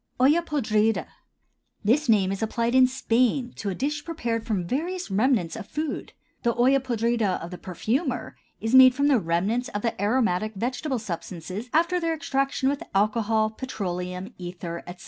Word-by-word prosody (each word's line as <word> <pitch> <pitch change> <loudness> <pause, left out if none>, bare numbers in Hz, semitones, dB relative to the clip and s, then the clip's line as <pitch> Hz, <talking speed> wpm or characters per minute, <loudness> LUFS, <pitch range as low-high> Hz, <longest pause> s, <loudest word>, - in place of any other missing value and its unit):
OLLA 290 +7 +5
PODRIDA. 225 -9 +1 0.8
This 250 +7 +2
name 195 -4 +4
is 195 - -4
applied 230 +2 0
in 260 -1 +6
Spain 250 0 +1
to 205 - -3
a 190 - -3
dish 295 +5 -2
prepared 235 -9 -3
from 200 -6 -1
various 340 - -3
remnants 205 -4 +2
of 225 -3 -7
food. 305 -2 -4 0.3
The 235 -2 +1
olla 260 +3 +4
podrida 235 -5 0
of 170 - -8
the 180 - -7
perfumer 240 - -2 0.2
is 225 +2 -2
made 260 -1 +9
from 285 +1 +2
the 265 -4 +4
remnants 195 +8 0
of 205 - -4
the 230 - +1
aromatic 215 -2 +1
vegetable 255 +6 -2
substances 185 +1 -6
after 340 +3 +2
their 330 -1 0
extraction 275 -2 -1
with 280 +1 0
alcohol, 215 +1 +2
petroleum 185 -4 -5
ether, 175 -1 -6
etc. 175 0 -9
230 Hz, 165 wpm, -25 LUFS, 200-265 Hz, 0.8 s, made